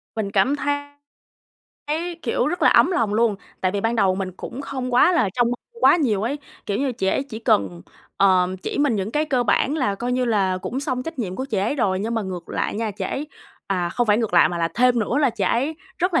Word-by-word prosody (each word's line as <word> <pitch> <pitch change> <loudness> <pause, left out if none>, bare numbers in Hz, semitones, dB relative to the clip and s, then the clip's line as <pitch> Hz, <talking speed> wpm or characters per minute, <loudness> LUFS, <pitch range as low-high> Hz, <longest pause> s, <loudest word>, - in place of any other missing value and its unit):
Mình 210 -3 -2
cảm 210 +9 +2
thấy 290 0 0 1.1
thấy, 335 +4 -2
kiểu, - - 0
rất 355 - -2
là - - +6
ấm - - +5
lòng 225 - 0
luôn, 225 -1 +3 0.3
tại 185 -1 0
vì 200 - -1
ban 230 +2 0
đầu 195 -4 +3
mình 190 -1 -4
cũng 260 - -7
không 260 -3 -4
quá 350 +8 +6
là 280 - +2
trông 240 -1 +2
mong 245 - -3 0.2
quá - - +7
nhiều 225 - +1
ấy. 265 +6 -2 0.3
Kiểu 200 - -1
như, 270 -2 0
chị 190 - -3
ấy 230 - +1
chỉ 250 -6 -8
cần, 95 - +1 0.3
ờ, 185 -2 +4 0.2
chỉ - - -3
mình 285 -6 +2
những 195 +1 -2
cái 300 +5 +1
cơ 260 -5 +1
bản 265 +5 +1
là 230 -9 0
coi 245 +5 -3
như 255 0 +1
là 195 -5 +1
cũng 250 +8 -4
xong 255 -2 -2
trách 325 0 -7
nhiệm 185 -5 -3
của 260 - -3
chị 225 -7 -2
ấy 205 +9 0
rồi. 195 -8 +1
Nhưng 225 +3 -2
mà 225 - 0
ngược 185 -3 -6
lại - - -2
nha, 225 0 -2
chị 200 -1 -5
ấy 280 +9 -3 0.4
à, 180 -3 -1
không 240 +7 -1
phải 210 +1 +4
ngược 225 -6 -1
lại 175 - +6
mà 175 - -4
là 165 0 +1
thêm 250 0 +3
nữa 235 +6 0
là 280 -5 +3
chị 215 -4 -2
ấy 270 +11 0 0.2
rất 360 0 0
là 330 - +4
230 Hz, 260 wpm, -22 LUFS, 195-270 Hz, 1.1 s, quá